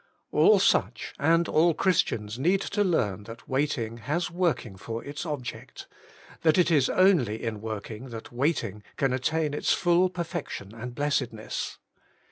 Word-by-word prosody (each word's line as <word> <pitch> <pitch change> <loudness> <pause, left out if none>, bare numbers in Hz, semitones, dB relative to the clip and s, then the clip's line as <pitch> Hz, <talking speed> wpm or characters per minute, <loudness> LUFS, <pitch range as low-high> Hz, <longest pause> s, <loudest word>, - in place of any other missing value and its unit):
All - - +6
such, - - +1
and 165 +3 +3
all 165 +1 +3
Christians, 115 - 0
need 180 +7 +2
to 205 +1 0
learn 105 - 0
that 115 +1 -11
waiting 130 -5 -1
has 155 +10 -2
working 170 - -1
for 115 +4 -6
its 145 +4 -6
object, 130 -6 -6 0.6
that 160 0 +4
it 175 -1 +4
is 140 -5 +4
only 160 - +3
in 110 -3 -3
working 110 +3 -6
that 115 -2 -8
waiting 120 - -1 0.2
can 135 -2 +1
attain 150 +4 0
its 150 - +1
full 175 +1 +3
perfection 170 - -5
and 120 +2 -7
blessedness. 130 -6 -2
135 Hz, 145 wpm, -27 LUFS, 115-170 Hz, 0.6 s, All